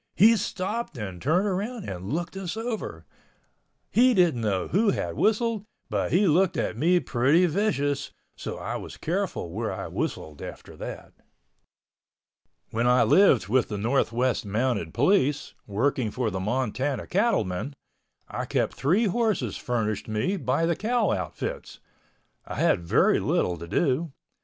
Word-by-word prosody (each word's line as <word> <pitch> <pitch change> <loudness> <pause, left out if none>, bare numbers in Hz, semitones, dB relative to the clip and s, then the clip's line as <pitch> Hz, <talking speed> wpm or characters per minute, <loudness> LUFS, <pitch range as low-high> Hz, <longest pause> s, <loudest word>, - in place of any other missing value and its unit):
He 220 +6 +7
stopped 200 - -3
and 95 -5 -6
turned 175 +8 +2
around 205 +4 -3
and 95 +2 -5
looked 170 +4 -3
us 195 +1 -4
over. 225 -1 -4 0.9
He 250 +1 +5
didn't 170 -10 +3
know 100 -4 0
who 205 +5 +2
had - - -1
whistled, 225 -1 +1 0.3
but - - 0
he 195 +4 +4
looked 180 +2 +3
at - - -1
me 175 +4 +3
pretty 140 +6 +3
vicious, 145 -7 0 0.3
so - - -6
I - - -4
was - - -9
careful 175 - -2
where 110 +5 -2
I - - -5
whistled 75 -2 -4
after - - -9
that. - - -8 1.6
When 115 +2 +1
I 125 +1 +5
lived 140 - +5
with 125 +4 +2
the 105 - -4
Northwest 120 +2 +1
Mounted 105 -4 -1
Police, 145 - +2
working 115 +3 0
for 120 0 -2
the 95 - -3
Montana 130 +6 -1
cattlemen, 140 - 0 0.5
I - - -4
kept - - 0
three 180 - +2
horses 200 - 0
furnished 110 -4 -2
me 110 - 0
by 145 -1 0
the 170 0 +1
cow 225 +1 +1
outfits. 90 -5 -4 0.7
I - - -5
had - - +2
very 85 - +3
little 90 - +1
to 85 0 -9
do. 150 - 0
140 Hz, 145 wpm, -26 LUFS, -, 1.6 s, He